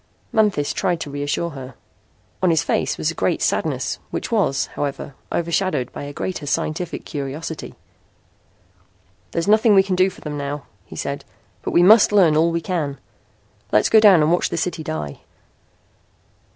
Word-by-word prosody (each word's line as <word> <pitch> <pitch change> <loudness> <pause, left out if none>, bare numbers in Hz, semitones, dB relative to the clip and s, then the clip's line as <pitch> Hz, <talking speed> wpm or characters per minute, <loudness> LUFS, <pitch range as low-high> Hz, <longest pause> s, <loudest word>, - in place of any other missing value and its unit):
Manthis 205 -10 +2
tried 180 -4 0
to 145 - -5
reassure 145 +4 -2
her. 135 -3 -9 0.7
On 185 - +3
his 165 -2 +2
face - - 0
was - - 0
a - - -8
great - - 0
sadness - - -1
which - - -4
was, 165 - +1
however, 140 0 -4 0.2
overshadowed 170 -6 -1
by - - -6
a 145 - -6
greater 150 0 -4
scientific 155 +5 -2
curiosity. 150 +3 -6 1.5
"There's 170 +3 -2
nothing 215 0 +5
we 190 - +6
can 190 -1 -1
do 185 +1 +3
for - - -15
them 150 -1 -5
now," 140 0 -4 0.2
he - - -11
said. 140 0 -4 0.4
"But - - -4
we 175 - +4
must 210 +4 +7
learn 180 -7 +5
all 160 +2 +4
we 170 0 -1
can. 155 -5 -2 0.7
Let's 105 - +3
go 220 - +7
down 195 -7 +7
and 155 - +2
watch 175 - +2
the - - -3
city 165 -1 -2
die." 75 - -5
165 Hz, 165 wpm, -21 LUFS, 145-185 Hz, 1.5 s, must